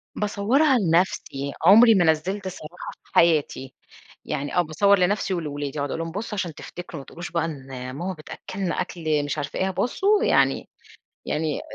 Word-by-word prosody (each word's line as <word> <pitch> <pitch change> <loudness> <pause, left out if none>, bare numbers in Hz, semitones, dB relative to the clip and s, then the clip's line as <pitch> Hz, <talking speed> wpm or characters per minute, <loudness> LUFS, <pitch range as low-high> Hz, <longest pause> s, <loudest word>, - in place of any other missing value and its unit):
باصورها 235 +8 +2
لنفسي، 165 - 0
عمري 225 +5 +8
ما 180 -3 +4
نزلت 185 +5 0
صراحة 180 -2 -8
في - - -27
حياتي، 150 -5 +2 0.5
يعني 145 +1 -3
آه، 180 - +5
باصور 200 +5 +3
لنفسي 190 +1 +1
ولولادي 145 -4 -3
بأقعد 145 0 -3
أقول - - -3
لهم 165 0 -4
بصوا 210 +5 -5
عشان 175 -4 -2
تفتكروا، 175 -3 -8
ما - - -14
تقولوش 170 +1 -8
بقى 165 -1 0
إن 140 -5 -7 0.3
ماما 175 +7 -4
بتأكلنا 185 +3 -4
أكل 160 -5 -1
مش 145 +1 -3
عارفة 145 -1 -4
إيه، 190 - +1
بصوا 390 - +1
يعني - - +2 0.6
يعني 150 -1 -1
175 Hz, 165 wpm, -24 LUFS, 155-195 Hz, 0.6 s, عمري